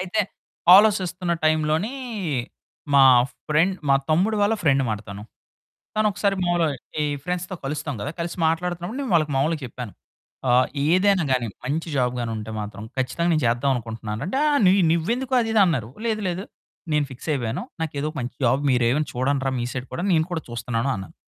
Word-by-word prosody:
అయితే 185 +4 0 0.6
ఆలోచిస్తున్నటైంలోని 175 - +2 1.0
మా 140 - +7 0.5
ఫ్రెండ్ 165 +5 +2
మా 140 - +6 0.2
తమ్ముడు 190 +8 +2
వాళ్ళ 205 +2 +3
ఫ్రెండ్ 140 -4 +3
అమాట 110 -4 -2
తను 100 +1 -7 0.7
తను 215 0 +3
ఒకసారి 200 0 0
మామూలుగా 175 -4 +1 0.3
ఈ - - +1 0.2
ఫ్రెండ్స్‌తో 180 +2 -3
కలుస్తాం 145 +1 -3
కదా! 145 - -3
కలిసి 170 0 -4
మాట్లాడుతున్నప్పుడు 175 +7 -2
నేను 265 -7 -3
వాళ్ళకి 155 -3 +2
మామూలుగా 150 +3 +1
చెప్పాను. 120 -3 -8 0.6
ఆహ్, 125 +1 +5 0.2
ఏదైనా 190 0 +3
గాని 125 -2 +1 0.2
మంచి 155 +6 -2
జాబ్ 125 -2 +1
గాని 120 -1 -2
ఉంటే 110 0 -6
మాత్రం 105 0 -6
ఖచ్చితంగా 170 +7 0
నేను 155 -2 +1
చేద్దాం 120 +4 +1
అనుకుంటున్నాను 110 -2 -5
రా - - -3
అంటే 230 +9 -1
ఆ - - +2
నీ 185 - +6 0.2
నువ్వెందుకు 235 +11 -1
అది 225 -1 -1
ఇది 220 - +4
అన్నారు. 140 - 0 0.2
లేదు 220 -2 0
లేదు 180 +2 -3 0.5
నేను 150 -1 +2
ఫిక్స్ 130 +4 -10
అయిపోయాను. 120 -6 -2 0.2
నాకు 160 -2 -3
ఏదో 150 - -1
మంచి 125 -1 -4
జాబ్ 130 +3 +3
మీరు 125 -2 +2
ఏమైనా 150 +3 0
చూడండి 130 +2 0
రా - - +2
మీ - - -1
సైడ్ 130 0 -5
కూడా. 175 - -3
నేను 160 -2 +3
కూడా 165 -3 -2
చూస్తున్నాను 120 +1 -2
అన్నాను. 95 -2 -8
155 Hz, 180 wpm, -23 LUFS, 125-180 Hz, 1.0 s, మా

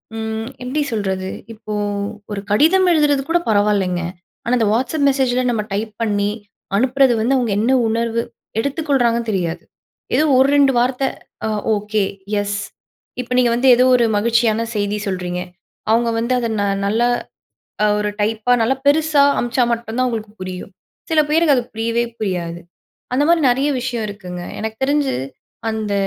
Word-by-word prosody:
ம் 220 +1 -4
எப்படி 265 +4 -1
சொல்றது? 190 -4 -2 0.2
இப்போ 215 -1 -8 0.6
ஒரு 200 - -3
கடிதம் 340 - +4
எழுதுறது 295 -4 +3
கூட 345 - +4
பரவாயில்லைங்க. 205 -4 +2 0.4
ஆனா 235 - -1
அந்த 225 -3 +2
WhatsApp 265 +6 0
மெசேஜில, 255 -2 +1
நம்ம 225 -3 0
டைப் 215 +1 -3
பண்ணி 205 -2 +1 0.5
அனுப்புறது 260 +3 +3
வந்து, 235 +5 +1
அவங்க 240 -4 0
என்ன 230 +4 +2 0.2
உணர்வு 230 +1 0 0.4
எடுத்துக்கொள்றாங்கன்னு 260 -4 0
தெரியாது. 175 -3 -2 0.5
ஏதோ - - +4
1 265 +1 +5
2 280 -1 +5
வார்த்தை 255 +2 +1 0.4
அ - - -1 0.3
ஓகே, 210 0 -1 0.4
எஸ். 205 0 -2 0.6
இப்ப 250 0 -12
நீங்க 245 -2 +4
வந்து 260 +2 +1
ஏதோ 250 - +4
ஒரு 240 -2 +3
மகிழ்ச்சியான 230 0 +2
செய்தி 205 0 -1
சொல்றீங்க. 180 -2 -3 0.5
அவங்க 230 +1 +3
வந்து 235 +2 0
அதை 235 -2 -2
ந - - +1 0.2
நல்லா 225 +4 +2 0.8
அ - - +5
ஒரு 210 - 0
டைப்பா, 220 +3 +1
நல்லா 250 +4 +2
பெருசா 300 -1 +4 0.2
அம்ச்சா 245 +1 +1
மட்டும் 230 0 -5
தான், 255 - +2
அவங்களுக்கு 220 -3 -4
புரியும். 185 +1 -6 0.4
சில 315 - +4
பேருக்கு, 315 -3 +4
அது 245 - 0
புரியவே 230 +1 0
புரியாது. 175 -4 -3 0.5
அந்தமாரி 310 +5 +3
நெறைய 270 +4 +1
விஷயம் 240 -3 -2
இருக்குங்க. 180 -3 -7 0.2
எனக்கு 220 0 -4
தெரிஞ்சு 285 -1 +1 0.6
அந்த 220 -2 -2
230 Hz, 150 wpm, -19 LUFS, 210-260 Hz, 0.8 s, 1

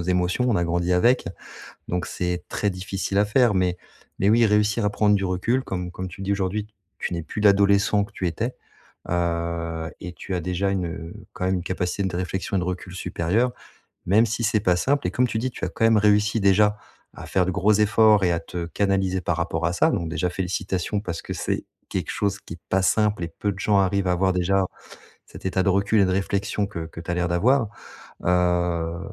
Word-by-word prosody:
émotions, 90 +7 0
on 115 - +2
a 85 - +1
grandi 85 +1 0
avec, 120 +8 +3 0.6
donc 90 0 -2
c'est 90 -1 -3
très 105 - 0
difficile 95 +1 -3
à 100 - +4
faire, 115 0 +3
mais 90 -1 +1 0.4
mais 100 - +3
oui, 115 +1 +5
réussir 105 +1 +2
à 105 - +1
prendre 105 0 +3
du 100 -1 0
recul 95 +8 0
comme 90 -5 -4
comme 95 +1 -6
tu 95 +2 -10
le - - -4
dis, 100 - 0
aujourd'hui: 100 +2 -2 0.3
«Tu 90 - -2
n'es 85 - -4
plus 105 - -5
l'adolescent 100 0 +4
que 100 - -10
tu 95 - -2
étais», 115 +9 -2 0.6
heu 85 -1 -2
et 90 0 -6
tu 95 +1 -5
as - - 0
déjà 90 +3 -1
une, 95 -2 -1
heu, 80 0 -6 0.2
quand 90 - -3
même 95 - +1
une 90 - -3
capacité 90 +1 -2
de 95 -2 -2
réflexion 95 +2 -2
et - - +2
de - - -2
recul 90 0 -5
supérieur 95 +7 0 0.5
même 105 +6 +5
si 115 +2 -2
c'est 110 0 +2
pas 90 -4 +3
simple 140 +9 +1
et - - -2
comme 125 - +2
tu 115 - -3
dis: 130 +3 -1
«Tu - - -4
as - - -3
quand - - -3
même 115 -1 +5
réussi 105 +1 +3
déjà 105 +2 +4 0.4
à - - -9
faire 90 -2 +2
de 95 - -1
gros 100 +3 +3
efforts 105 0 +4
et 90 - +2
à 85 - 0
te 85 +1 -5
canaliser 95 0 0
par 85 -1 -1
rapport 80 -1 -1
à 85 - -1
ça» - - +3
donc 85 -5 -2
déjà 90 +1 -1
félicitations 95 +1 -2
parce 85 -5 -5
que - - -6
c'est - - -2 0.2
quelque - - -3
chose 100 -1 -1
qui - - -10
est 85 - -19
pas 95 - +2
simple 105 -3 +2
et - - -7
peu 100 - 0
de 95 - -12
gens 105 +1 +2
arrivent 95 0 +1
à 90 - +3
avoir 95 +1 +2
déjà 95 +2 +2 0.6
cet - - -13
état 95 0 +1
de - - +2
recul 100 +3 +2
et - - +5
de 95 - 0
réflexion 100 +1 -1
que 85 -5 -6
que 80 - -10
tu 90 - -7
as - - +1
l'air 85 0 0
d'avoir, 115 +8 +2 0.6
heu 85 -2 +1
95 Hz, 230 wpm, -24 LUFS, 90-105 Hz, 0.6 s, oui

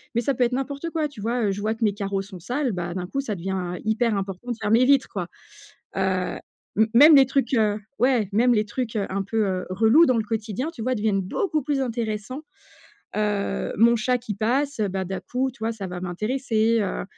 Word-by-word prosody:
Mais 235 - +2
ça 275 +3 0
peut 245 0 +2
être 240 - -2
n'importe 280 +5 -3
quoi, 310 -3 -1
tu 270 - -14
vois, 235 +3 -1
heu, - - +1
je 195 - -4
vois 215 +2 -1
que 225 - -4
mes 205 -2 +3
carreaux 195 -1 -2
sont 190 -2 -10
sales, 250 - -1
bah 175 -2 -4
d'un 180 -1 -4
coup, 275 +9 -3
ça 220 -7 -2
devient, 180 0 -3
heu, - - -8
hyper 220 0 +1
important 195 +4 -5
de - - -2
faire 210 - -1
mes 240 +3 +5
vitres, 275 -1 +4
quoi. 180 -4 -3 0.7
Heu, 190 -1 -1 0.6
même 295 +4 +9
les 270 - +7
trucs, 265 -1 0
heu 215 -3 +2 0.2
ouais, 240 -5 +2
même 240 +4 +4
les 210 0 +2
trucs, 225 +2 -4
heu, 200 -2 0
un 195 +1 -1
peu, 215 +1 0
heu, 185 -1 -2
relous 225 - +5
dans 255 -2 +3
le 220 - +1
quotidien, 225 - -3
tu 235 - -9
vois, 255 +2 0
deviennent 205 -2 +1
beaucoup 310 - -1
plus 275 0 -1
intéressants. 230 +2 -3 0.8
Heu, 205 -2 -1
mon 235 +3 +5
chat 250 +3 +1
qui 225 -4 -5
passe, 255 +5 0
bah, 190 0 -2
d'un 190 +1 -4
coup, 260 +1 -2
tu 265 - -21
vois, 225 +1 -1
ça 200 -4 -6
va 180 0 -6
m'intéresser, 220 +4 0
heu 195 - -2
220 Hz, 230 wpm, -24 LUFS, 195-255 Hz, 0.8 s, même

